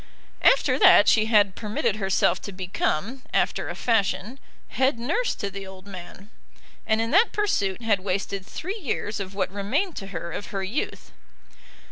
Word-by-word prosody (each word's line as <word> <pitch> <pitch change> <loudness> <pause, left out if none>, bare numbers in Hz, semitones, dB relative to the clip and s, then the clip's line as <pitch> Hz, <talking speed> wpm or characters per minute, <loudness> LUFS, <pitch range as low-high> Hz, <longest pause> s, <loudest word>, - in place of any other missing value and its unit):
After - - +4
that 375 - +7
she 215 -1 +5
had 205 -4 +4
permitted 215 +1 -2
herself 195 -3 +1
to 200 - -7
become, 190 +5 -2
after - - +1
a - - -5
fashion, 225 +2 0 0.3
head 260 -1 +1
nurse 330 - -1
to 200 - -4
the 195 0 -7
old 190 0 -12
man, 195 +2 -11 0.6
and 220 0 +2
in 230 +1 -1
that 385 +9 +5
pursuit 235 - 0
had 210 -4 +2
wasted 195 +1 -3
three 375 - -6
years 220 - -3
of 195 0 -6
what 190 -2 -1
remained 260 - -1
to 195 - -6
her 170 -3 -6
of 200 - -5
her 195 -1 -4
youth. 215 +10 -4
205 Hz, 165 wpm, -25 LUFS, 195-250 Hz, 0.6 s, that